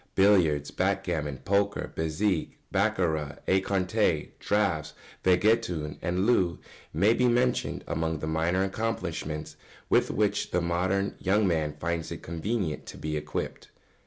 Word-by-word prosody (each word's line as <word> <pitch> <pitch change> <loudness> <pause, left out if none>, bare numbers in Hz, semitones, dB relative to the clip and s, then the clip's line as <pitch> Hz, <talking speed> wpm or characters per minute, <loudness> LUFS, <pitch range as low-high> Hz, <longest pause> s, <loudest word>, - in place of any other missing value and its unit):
] - - -42
Billiards, 85 -8 +4
backgammon, 90 -7 -1
poker, 100 +1 0
bézique, 80 +3 0 0.2
baccarat, 85 -8 0
écarté, 95 -1 +1
draughts, 95 -7 0 0.3
vingt 90 +2 +3
et 115 +1 +4
un, 75 -4 -4
and 90 +3 0
loo 95 -8 +3 0.3
may 100 +9 +4
be 125 +1 +2
mentioned 125 +1 +1
among 80 0 -1
the 75 - -5
minor 80 +4 +1
accomplishments 90 -7 -3 0.3
with - - +4
which - - 0
the 90 - +1
modern 95 +3 0
young 100 +2 +2
man 80 -4 0
finds 85 0 -2
it 85 - -7
convenient 85 0 -2
to - - -8
be 75 0 -3
equipped. 75 0 -4
90 Hz, 135 wpm, -28 LUFS, 80-100 Hz, 0.3 s, Billiards